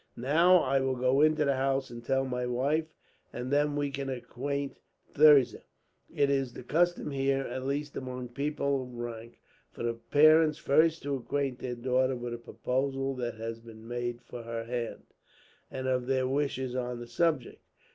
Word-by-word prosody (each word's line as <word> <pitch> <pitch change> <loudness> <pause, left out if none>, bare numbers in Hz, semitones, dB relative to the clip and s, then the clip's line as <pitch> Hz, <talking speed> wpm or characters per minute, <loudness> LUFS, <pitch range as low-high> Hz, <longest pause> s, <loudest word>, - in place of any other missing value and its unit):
"Now 165 +9 +5
I 135 +1 +2
will 130 0 0
go 130 +2 +2
into 155 0 +4
the 140 - +3
house 135 0 0
and 120 0 -8
tell 135 +2 +1
my 125 -1 -2
wife, 140 +6 0 0.4
and 125 +2 -5
then 145 0 +2
we 145 -1 -1
can 135 0 -4
acquaint 135 +3 -4 0.3
Thirza. 145 -5 +6 0.5
It 140 -1 +2
is 135 -3 0
the - - -9
custom 175 +3 +1
here, 135 0 +1
at 130 +1 -5
least 145 +1 -2
among 125 -1 -5
people 140 +1 -1
of 125 -1 -9
rank, 115 -1 -7 0.3
for - - -7
the 120 0 0
parents 155 +6 +4
first 160 +3 +3
to 140 -1 -1
acquaint 135 0 -2
their 125 -1 -4
daughter 130 +2 +1
with 120 -1 -5
a 120 - -5
proposal 135 +3 -2
that 120 -2 -3
has 115 +1 -5
been 115 -1 -13
made 120 0 -4
for 120 0 -8
her 115 0 -5
hand, 120 0 -4 0.7
and 130 0 -4
of 125 -1 0
their 130 -1 +1
wishes 130 -2 -1
on 125 -1 -3
the 120 - -7
subject. 155 -1 -1
130 Hz, 175 wpm, -30 LUFS, 120-140 Hz, 0.7 s, Thirza